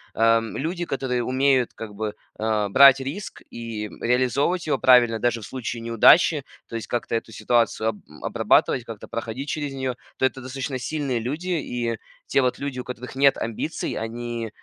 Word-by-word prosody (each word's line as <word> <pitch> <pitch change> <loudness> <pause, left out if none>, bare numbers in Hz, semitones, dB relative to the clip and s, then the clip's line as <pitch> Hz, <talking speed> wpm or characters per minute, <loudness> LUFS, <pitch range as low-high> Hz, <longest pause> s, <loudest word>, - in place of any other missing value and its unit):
э, - - -9
м, 115 0 +3
люди, 175 +4 -2
которые 125 -4 -1
умеют 130 0 +2
как 110 -2 -8
бы, 105 0 -4 0.2
э, 110 -1 +1
брать 135 +4 +8
риск 145 +10 -6
и, 115 -2 -5
м, - - -15 0.2
реализовывать 140 +8 0
его - - +2
правильно 120 -3 +5
даже 120 0 0
в - - -8
случае 120 -1 -5
неудачи, 140 +6 +5 0.3
то - - -7
есть 115 - -7
как-то 120 -1 -3
эту 115 0 -3
ситуацию 115 -1 +1
об 105 - -5 0.3
обрабатывать, 120 -2 +2
как-то 115 -3 -9
проходить 115 +5 -5
через 145 -3 -3
неё, 130 -2 -3 0.2
то - - +2
это 130 0 -1
достаточно 130 +1 -4
сильные 140 -2 -2
люди. 150 +10 -4
И 120 -9 -2 0.3
те 135 - +3
вот 125 -1 0
люди, 140 -3 -4
у - - -4
которых 125 +1 -7
нет 140 0 +4
амбиций, 115 +8 -3
они, 115 0 -4
э, - - -9
125 Hz, 185 wpm, -24 LUFS, 115-135 Hz, 0.3 s, брать